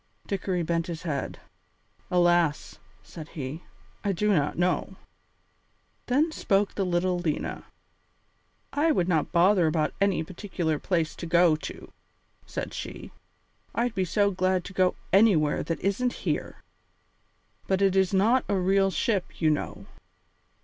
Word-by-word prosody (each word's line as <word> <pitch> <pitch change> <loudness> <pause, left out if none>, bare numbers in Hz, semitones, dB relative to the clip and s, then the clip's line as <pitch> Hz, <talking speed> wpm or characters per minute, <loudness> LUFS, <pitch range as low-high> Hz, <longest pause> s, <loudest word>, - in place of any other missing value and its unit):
Dickory 185 -3 -2
bent 165 0 -1
his 165 -1 -6
head. 145 -6 -3 0.7
"Alas!" 175 -3 +2 0.2
said 160 -3 -10
he, 145 +2 -6 0.4
"I 200 - +1
do 210 +3 +1
not 150 -4 0
know." 180 +2 0 1.1
Then 295 +6 +2
spoke 200 -8 +1
the 200 - -1
little 180 0 +1
Lena. 160 -4 -3 1.1
"I 310 +3 +3
would 180 - +1
not 160 -4 +1
bother 180 0 +4
about 155 -1 0
any 195 -4 +2
particular 170 -3 -3
place 165 -4 -1
to 170 - -6
go 170 -1 +4
to," - - -9 0.5
said - - -5
she. - - -7 0.6
"I'd 240 0 0
be 190 -4 0
so 200 +3 +2
glad 185 -1 +1
to 195 - -8
go 185 -1 +2 0.2
anywhere 190 -8 +4
that 165 - -3
isn't 240 +6 0
here. - - -3 1.0
But 190 -1 +1
it 195 -1 +3
is 190 -1 +3
not 220 +7 +3
a 200 - +2
real 195 +1 +3
ship, 190 +2 -1
you 155 -2 +3
know." 150 - -3
180 Hz, 140 wpm, -27 LUFS, 165-195 Hz, 1.1 s, bother